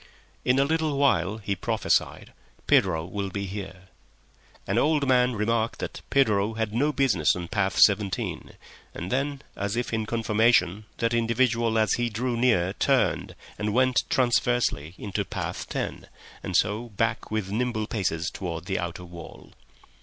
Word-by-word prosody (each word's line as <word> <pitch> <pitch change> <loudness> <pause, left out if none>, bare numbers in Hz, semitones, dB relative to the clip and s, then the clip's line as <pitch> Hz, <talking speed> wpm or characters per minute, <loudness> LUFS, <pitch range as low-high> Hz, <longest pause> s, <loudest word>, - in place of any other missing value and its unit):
"In 125 +1 +2
a 135 - +5
little 155 -1 0
while," 110 -8 +2
he 100 -2 -3
prophesied, - - -1 0.3
"Pedro 80 -4 +3
will 100 +2 -4
be 100 +1 -4
here." 95 -1 -8 0.8
An 100 +4 +1
old 150 -1 +2
man 125 -1 +3
remarked 115 +1 0
that - - -6
Pedro 110 -6 +2
had 110 -2 -2
no 145 +6 +2
business 125 - +2
on 90 -1 -5
path 100 -2 0
Seventeen, 100 -2 +2 0.4
and 90 +2 -5
then, 140 +1 -1
as 100 +1 -2
if 120 -1 -2
in 110 -1 -1
confirmation, 110 -3 +2
that 115 0 0
individual 115 -1 +1
as 110 -3 +3
he 120 0 0
drew 120 +3 -2
near 115 -7 +2
turned - - +1 0.2
and 105 0 -1
went 130 -1 +3
transversely 120 - +1
into 100 0 -3
path - - -5
Ten, - - -4 0.3
and 90 - 0
so 110 +4 0
back 115 +2 -1
with 110 -3 -2
nimble 115 -1 -1
paces 90 -6 -2
towards 85 -3 -5
the 95 0 -1
outer 85 +1 -5
wall. 85 -1 -11
110 Hz, 155 wpm, -26 LUFS, 95-120 Hz, 0.8 s, a